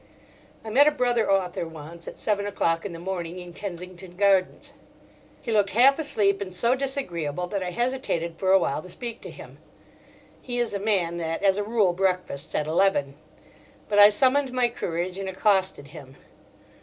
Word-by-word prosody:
I 220 - -5
met 280 +6 +6
a - - +5
brother 245 -6 +1
author 180 -3 0
once 165 +1 -10
at - - -8
seven 205 -2 -1
o'clock 165 -2 0
in - - -9
the 170 - -8
morning 175 -1 -5
in 180 -1 -9
Kensington 180 -1 -8
Gardens. 195 -2 +1 0.7
He - - -3
looked 205 -2 +3
half 260 +8 +5
asleep 205 -10 +1
and 190 -2 -5
so 235 +7 +2
disagreeable 180 - -3
that 200 -1 -2
I 180 - -3
hesitated 180 -7 -2
for 190 -1 +1
awhile 175 -6 +2
to 185 - -12
speak 235 +4 -7
to - - -8
him: - - -12 0.8
he 245 -1 -5
is 240 -3 -1
a 200 - -2
man 190 -5 0
that 165 +2 -3
as 195 0 +3
a - - 0
rule 210 -4 +2
breakfasts 180 -6 -2
at 150 - 0
eleven. 155 -4 +1 0.8
But 205 -1 +3
I 205 0 +10
summoned 260 +5 +2
my 250 -1 +1
courage 180 -4 -4
and 195 -1 -4
accosted 190 -6 0
him. 140 -3 -12
195 Hz, 180 wpm, -25 LUFS, 170-220 Hz, 0.8 s, I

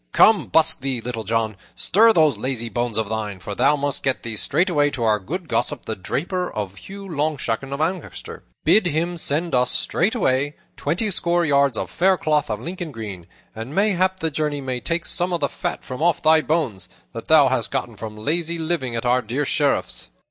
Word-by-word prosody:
Come, 220 -1 +5
busk 160 0 +5
thee, 135 -2 -2
Little 115 -1 -5
John! 110 -1 0 0.2
Stir 225 +5 +4
those 155 - +4
lazy 120 +1 -2
bones 120 -2 -2
of 110 -2 0
thine, 105 -3 -4
for 100 +3 -6
thou 145 - +3
must 145 -1 -1
get 135 -1 0
thee 115 -2 -4
straightway 150 - +2
to 135 -5 -4
our 110 -2 +3
good 165 - -5
gossip, 145 -3 -1
the 110 - -3
draper 180 - -3 0.2
Hugh 195 - -10
Longshanks 145 -7 -1
of 140 - -4
Ancaster. 175 +4 -4 0.2
Bid 215 -4 +4
him 170 +2 -1
send 160 0 0
us 125 0 +3
straightway 145 - +1 0.2
twenty 210 +5 -1
score 175 -1 +2
yards 140 -4 +3
of - - -4
fair 190 +1 +3
cloth 150 -5 0
of 105 -2 -2
Lincoln 175 +4 -6
green; 100 -8 -7 0.3
and 115 +7 -7
mayhap 190 -2 +2
the 160 -1 0
journey 150 0 -1
may 130 -2 -3
take 170 +5 -2
some 180 +1 +1
of 175 - 0
the 140 - +1
fat - - -4
from 130 +2 -7
off 170 -2 +3
thy 160 0 +5
bones, 125 - -1 0.2
that 115 - -7
thou 150 -4 +6
hast 125 -3 0
gotten 115 - -3
from 105 +1 -8
lazy 165 +8 -1
living 160 -7 -2
at 115 - -3
our 125 +1 +3
dear 125 +6 -2
Sheriff's." 145 0 -1
145 Hz, 195 wpm, -22 LUFS, 115-170 Hz, 0.3 s, thou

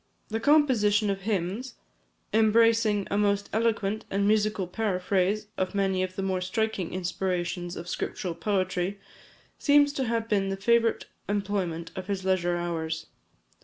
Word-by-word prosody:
The 225 +1 -2
composition 225 -7 +3
of 195 0 -4
hymns, 205 +5 -2 0.6
embracing 220 -1 +4
a 200 - +1
most 200 -1 +1
eloquent 220 -1 0
and 200 +1 +1
musical 210 -2 +2
paraphrase 195 +1 0
of 185 +2 -1
many 190 -2 +1
of 185 0 -3
the 195 - -3
more 190 -1 -1
striking 190 -1 -1
inspirations 175 -1 -2
of 170 - -7
scriptural 180 0 -3
poetry, 185 +1 -1 0.6
seems 285 -1 +4
to 270 -3 -1
have 230 -1 -1
been 195 -3 +1
the 195 - -2
favourite 230 +3 +2 0.2
employment 190 -5 -2
of 185 -1 -6
his 195 -2 -3
leisure 175 -2 +1
hours. 165 -2 -3
200 Hz, 140 wpm, -27 LUFS, 185-220 Hz, 0.6 s, embracing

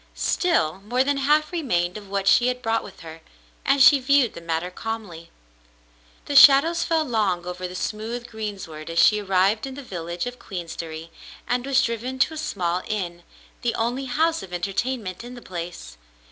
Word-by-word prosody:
Still, 195 - +1
more 245 +5 +1
than 285 +1 0
half 300 +4 +2
remained 180 - -1
of 205 -2 -9
what 195 0 -2
she 240 +5 +5
had 250 0 -2
brought 225 0 0
with 195 - -12
her, 165 0 -10 0.4
and 275 0 +4
she 285 0 +8
viewed 270 -2 +3
the 170 - -9
matter 165 +2 -2
calmly. 195 -6 -6 1.0
The 285 - -4
shadows 295 +5 +7
fell 320 -2 +1
long 205 - 0
over 180 0 -5
the 180 - -9
smooth 225 +5 -4
greensward 200 -9 -7
as 165 - -5
she 210 +4 +5
arrived 195 +4 +1
in 265 - -8
the 285 - -8
village 170 -5 -5
of 245 0 -6
Queensderry 165 -3 -7 0.4
and 245 +1 -1
was 275 -1 +3
driven 240 +3 -3
to 290 +4 +2
a - - -7
small 180 - -2
inn, 175 -5 -3 0.4
the 240 - -1
only 245 +4 -1
house 320 +6 +1
of 185 - -10
entertainment 200 +2 -3
in 245 +1 -9
the - - -9
place. 175 - -8
220 Hz, 180 wpm, -24 LUFS, 180-260 Hz, 1.0 s, she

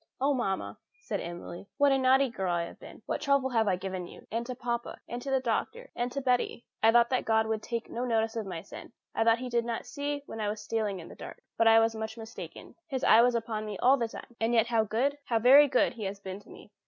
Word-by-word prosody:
"Oh, 280 +2 +2
mamma," 195 -7 -2 0.2
said - - -4
Emily, 175 +2 -8
"what 285 -1 +4
a 270 - +4
naughty 265 +1 +4
girl 185 -6 -1
have 170 0 -2
I - - -14
been! - - -14
What - - -3
trouble 280 -2 +2
have 225 -3 +2
I 190 - +3
given 185 -1 -5
to - - -13
you, - - -14
and 230 +2 -1
to 255 - -4
papa, 235 -1 -4
and 240 +1 -5
to 275 - -5
the 265 0 +2
doctor, 260 - -2
and 245 +1 -2
to 275 - -3
Betty! 250 -2 0 0.2
I 225 - +6
thought 235 +1 +4
that 255 - +1
God 220 0 +2
would 220 -1 -2
take 235 0 -4
no 240 - -4
notice 225 -2 0
of 220 -3 -3
my 170 -3 -5
sin. 200 - -11 0.2
I - - +1
thought 230 0 +4
He 250 +1 -5
did 235 -1 +2
not 230 -1 -4
see 285 0 -4
when 225 - -7
I 210 - 0
was 210 +1 -4
stealing 210 -2 -2
in 165 - -10
the - - -11
dark. - - -10
But 230 - +3
I 225 0 +8
was 225 0 +2
much 220 0 -5
mistaken. 225 0 -9
His 265 -4 -3
eye 225 - +7
was 245 0 +3
upon 225 -2 -2
me 210 -2 -5
all 260 +6 +5
the 235 -3 -1
time. 235 +1 -11
And 225 +2 +1
yet 225 - +5
how 225 -2 +1
good, 265 +7 0
how 230 - +1
very 270 +6 +7
good, 255 - +2
He 220 -3 -6
has 195 +1 -4
been 190 0 -7
to 205 - -20
me! - - -14
230 Hz, 275 wpm, -29 LUFS, 215-255 Hz, 0.2 s, I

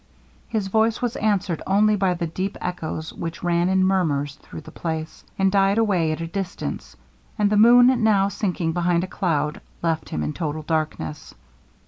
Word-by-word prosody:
His 215 -4 -1
voice 220 +2 +2
was 245 -2 -2
answered 195 -6 0
only 210 +2 +4
by 190 -3 +1
the 170 - -2
deep 185 +4 -4
echoes 160 -3 -4
which 165 +1 -6
ran 175 0 +2
in 190 0 +3
murmurs 150 -7 +1
through - - -10
the - - -12
place, 160 -1 -5
and 195 0 +2
died 195 +1 +3
away 190 -8 +2
at 155 - -4
a - - -2
distance; 180 +2 -5 0.4
and 210 -1 +2
the - - +3
moon 245 +3 +6
now 200 -3 +4
sinking 185 -4 -2
behind 175 0 +1
a - - -3
cloud, 150 -4 -1 0.2
left 165 -1 -1
him 75 - -3
in 75 - -2
total 155 -1 -4
darkness. 155 -1 -3
180 Hz, 175 wpm, -23 LUFS, 160-205 Hz, 0.4 s, moon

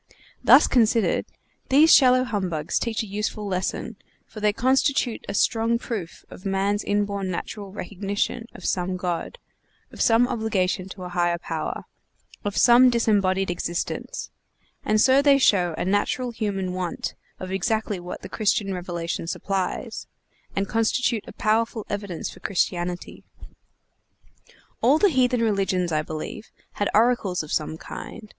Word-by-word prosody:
Thus - - +8
considered, 230 -2 +2 0.4
these 300 +4 +6
shallow 255 -2 +6
humbugs 180 -10 -2
teach 230 -1 -2
a - - -6
useful 210 +1 -3
lesson, 190 +3 -3 0.3
for 215 - -11
they 210 0 +3
constitute 260 +1 +1
a - - -3
strong 230 +3 +2
proof 215 -8 -6
of - - -11
man's 200 +1 0
inborn 200 -1 -1
natural 195 +2 -5
recognition 205 +4 -3
of - - -10
some 185 0 -1
God, 175 -2 -3 0.5
of - - -7
some 230 +2 +4
obligation 195 -6 -1
to 185 -1 -9
a 180 - -6
higher 175 -1 +1
power, - - -4 0.6
of 205 -1 -3
some 245 +1 +7
disembodied 195 -5 +2
existence; 175 - -4 0.5
and 215 0 +2
so 265 +4 +5
they 285 -1 +5
show 180 -10 +3
a - - -2
natural 205 +6 0
human 195 -5 -2
want 180 -2 -3 0.3
of 185 0 -6
exactly 205 +1 -1
what 175 +1 -8
the - - -6
Christian 205 -2 0
revelation 175 -2 -4
supplies, 190 +2 -3 0.5
and 195 0 0
constitute 225 +1 0
a - - -9
powerful 220 0 0
evidence 200 -4 -4
for - - -10
Christianity. 175 -2 -2 1.6
All 265 +6 +5
the 405 +5 +4
heathen 250 -5 +2
religions, 195 -5 0
I 155 -1 +1
believe, 155 +7 -7 0.2
had 205 - -1
oracles 215 -6 +2
of 155 - -6
some 155 +1 -1
kind. 215 +5 -9
205 Hz, 140 wpm, -24 LUFS, 185-230 Hz, 1.6 s, Thus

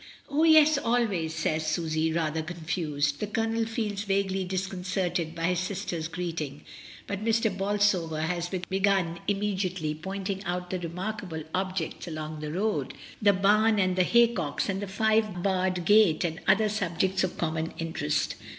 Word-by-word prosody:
"Oh, 295 +2 +1
yes, 310 -2 +6
always," 225 -10 0
says 155 0 0
Susy, 160 0 0
rather 160 -1 0
confused. 155 -3 -2
The 210 - -2
Colonel 225 +1 0
feels 215 -3 -2
vaguely 195 -2 0
disconcerted 180 -2 -2
by 165 - -5
his 180 -1 +1
sister's 185 -4 -3
greeting, 165 -4 -4 0.4
but 200 +1 -4
Mr. 225 -2 +2
Bolsover 195 -5 +1
has 170 +1 -1
begun 190 -2 0
immediately 190 -6 -1
pointing 190 +4 -4
out 180 -1 -3
the 185 - -1
remarkable 180 -1 -5
objects 185 -2 -2
along 155 -1 -5
the 150 0 -5
road, 205 +6 -1 0.3
the 205 -1 +6
bam 210 +3 +3
and 185 -2 +2
the 185 - +3
haycocks 215 -8 +2
and 195 0 -1
the 205 - -4
five 215 -2 +1
barred 185 -2 0
gate 205 -5 +5
and 165 -2 -2
other 210 +3 +5
subjects 190 -2 0
of 185 - -2
common 160 -1 -1
interest. 165 - -1
185 Hz, 150 wpm, -28 LUFS, 165-205 Hz, 0.4 s, yes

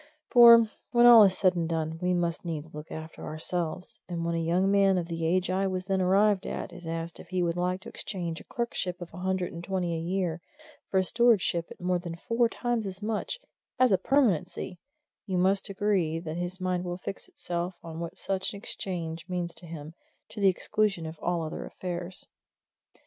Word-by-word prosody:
For, 235 -2 +9 0.2
when 240 0 +5
all 240 -2 +10
is 190 -1 +2
said 185 -2 +3
and 170 -1 -1
done, 160 0 -2
we 180 0 +2
must 170 -1 -1
needs 160 -2 -5
look 150 +1 -9
after 160 0 -8
ourselves, 170 +3 -3
and 170 -1 -3
when 170 - 0
a 165 - 0
young 175 +4 +2
man 195 -1 +4
of 175 - -1
the 165 -1 -2
age 185 +2 +1
I 195 +1 +1
was 185 -1 -3
then 190 -1 +1
arrived 195 +2 +3
at 180 - -5
is 175 -1 -10
asked 165 0 -4
if - - -11
he 185 -1 0
would 170 -1 0
like 180 +1 -1
to 230 - -9
exchange 170 -4 -4
a - - -12
clerkship 195 -7 -3
of 175 -2 -9
a 175 - -8
hundred 185 -1 -1
and 170 0 -7
twenty 180 -2 -1
a 165 - -2
year 175 -1 -1 0.5
for 190 - +1
a 190 - +4
stewardship 205 -6 +3
at - - -12
more 180 0 0
than 170 -1 -6
four 230 +7 +1
times 240 -3 -1
as 190 +1 -7
much 220 - -2 0.4
as 255 -2 +4
a 190 - +5
permanency 190 - +1 0.5
you 185 -2 -1
must 190 +2 +2
agree 190 -5 +1
that 165 -1 -5
his 175 +2 -4
mind 185 -1 -1
will 175 -1 -4
fix 190 - -7
itself 175 +1 -4
on 165 -1 -7
what 170 0 -5
such 190 0 -2
an - - -7
exchange 170 -5 -4
means 175 -1 -2
to 175 - -3
him, 160 -1 -8 0.4
to 215 - -9
the 195 - +6
exclusion 195 -1 0
of 160 0 -7
all 175 -1 -1
other 155 - -5
affairs. 180 0 -6
180 Hz, 210 wpm, -28 LUFS, 170-195 Hz, 0.5 s, all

